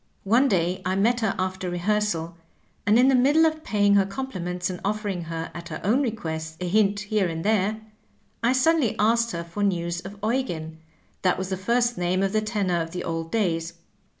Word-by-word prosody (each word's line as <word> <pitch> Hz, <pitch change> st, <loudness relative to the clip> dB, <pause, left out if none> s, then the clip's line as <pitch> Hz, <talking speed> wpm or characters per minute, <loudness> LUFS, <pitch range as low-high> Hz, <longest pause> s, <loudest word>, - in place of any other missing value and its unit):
One 235 Hz, +7 st, +4 dB
day 180 Hz, -4 st, 0 dB
I 185 Hz, +1 st, 0 dB
met 230 Hz, +5 st, +2 dB
her 220 Hz, -4 st, 0 dB
after 185 Hz, 0 st, -2 dB
rehearsal, 175 Hz, -2 st, -1 dB, 0.5 s
and 210 Hz, +2 st, +5 dB
in 250 Hz, +2 st, +5 dB
the 270 Hz, -, +4 dB
middle 285 Hz, +6 st, +5 dB
of 315 Hz, -1 st, 0 dB
paying 205 Hz, -1 st, +2 dB
her 195 Hz, -, +4 dB
compliments 180 Hz, -7 st, -4 dB
and 180 Hz, -1 st, -5 dB
oflEering 200 Hz, -4 st, -2 dB
her 165 Hz, 0 st, -5 dB
at 170 Hz, 0 st, -8 dB
her 155 Hz, -, -5 dB
own 230 Hz, +8 st, +3 dB
request 160 Hz, -, -4 dB
a 180 Hz, -, -3 dB
hint 205 Hz, +1 st, +2 dB
here 210 Hz, -2 st, 0 dB
and 165 Hz, +1 st, -4 dB
there, 215 Hz, 0 st, +1 dB, 0.6 s
I 240 Hz, +2 st, +3 dB
suddenly 265 Hz, -2 st, +2 dB
asked 230 Hz, +2 st, +3 dB
her 170 Hz, -5 st, -4 dB
for 170 Hz, +5 st, -6 dB
news 175 Hz, -3 st, 0 dB
of 195 Hz, +3 st, -9 dB
Eugen 175 Hz, -10 st, -2 dB, 0.2 s
— -, -, -39 dB
^that 185 Hz, -, +3 dB
was 190 Hz, 0 st, -4 dB
the 190 Hz, -, -1 dB
first 235 Hz, +4 st, 0 dB
name 180 Hz, +2 st, +1 dB
of 195 Hz, +1 st, 0 dB
the 215 Hz, -, +2 dB
tenor 200 Hz, -5 st, 0 dB
of 165 Hz, +1 st, -6 dB
the 180 Hz, -, -4 dB
old 165 Hz, 0 st, -4 dB
days. 170 Hz, -6 st, 0 dB
195 Hz, 205 wpm, -25 LUFS, 175-220 Hz, 0.6 s, and